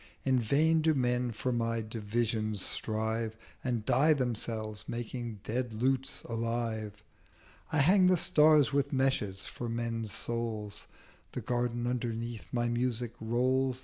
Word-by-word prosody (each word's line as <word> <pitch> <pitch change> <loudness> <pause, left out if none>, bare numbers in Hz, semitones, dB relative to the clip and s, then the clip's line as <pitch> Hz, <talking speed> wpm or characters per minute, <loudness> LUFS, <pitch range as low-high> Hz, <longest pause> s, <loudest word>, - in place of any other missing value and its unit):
In 130 -1 +3
vain 155 +8 +3
do 160 0 +3
Men 125 -1 +1
for 125 +3 -2
my 115 -1 0
Divisions 110 -1 -2
strive, 110 0 -2 0.3
And 120 -4 -1
die 135 +5 +5
themselves 115 -5 -3
making 120 -2 -5
dead 120 0 -2
Lutes 135 +4 0
alive: 115 -2 -3 0.7
I 160 - +1
hang 180 +6 +6
the 185 0 +5
Stars 150 -3 +5
with 140 0 +1
Meshes 130 -8 0
for 120 - -5
Men's 115 -2 -2
Souls: 110 -2 -3 0.5
The - - -3
Garden 120 -1 -1
underneath 120 -2 -3
my 120 -1 0
Music 120 -1 -1
rolls. 130 +3 +1
120 Hz, 130 wpm, -31 LUFS, 110-130 Hz, 0.7 s, hang